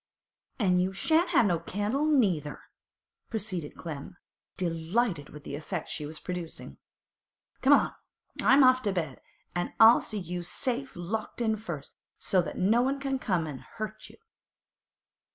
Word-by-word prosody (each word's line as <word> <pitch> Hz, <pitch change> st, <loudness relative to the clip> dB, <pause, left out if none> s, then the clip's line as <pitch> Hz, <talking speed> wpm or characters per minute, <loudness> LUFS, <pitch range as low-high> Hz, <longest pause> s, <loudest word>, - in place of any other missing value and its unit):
'An' 185 Hz, -6 st, +3 dB
you 185 Hz, +1 st, 0 dB
shan't 320 Hz, -, +2 dB
have 300 Hz, -9 st, +5 dB
no 175 Hz, -4 st, +2 dB
candle, 210 Hz, -, -1 dB
neither,' 185 Hz, -, +1 dB, 0.7 s
proceeded 190 Hz, -8 st, -4 dB
Clem, 160 Hz, +2 st, -7 dB, 0.4 s
delighted 170 Hz, -, -1 dB
with 150 Hz, 0 st, -11 dB
the -, -, -7 dB
effect 160 Hz, +3 st, -5 dB
she 150 Hz, -2 st, -3 dB
was 155 Hz, +1 st, -7 dB
producing. 180 Hz, -3 st, -6 dB, 0.8 s
'Come -, -, +6 dB
along! -, -, +4 dB, 0.5 s
I'm 275 Hz, +1 st, +6 dB
off 255 Hz, 0 st, +6 dB
to 205 Hz, -, 0 dB
bed, 160 Hz, -8 st, -3 dB, 0.3 s
an' 175 Hz, 0 st, -3 dB
I'll 225 Hz, +2 st, +9 dB
see 215 Hz, -, -5 dB
you 180 Hz, -2 st, -4 dB
safe 255 Hz, +9 st, -2 dB
locked 205 Hz, +8 st, -4 dB
in 220 Hz, -2 st, +2 dB
first, 170 Hz, -10 st, -7 dB, 0.2 s
so 185 Hz, -, +2 dB
as -, -, -5 dB
no 220 Hz, +6 st, +3 dB
one 270 Hz, +2 st, 0 dB
can 270 Hz, -1 st, -1 dB
come 180 Hz, -8 st, 0 dB
an' 145 Hz, -4 st, -6 dB
hurt 215 Hz, 0 st, -7 dB
you. -, -, -16 dB
190 Hz, 150 wpm, -29 LUFS, 165-235 Hz, 0.8 s, I'll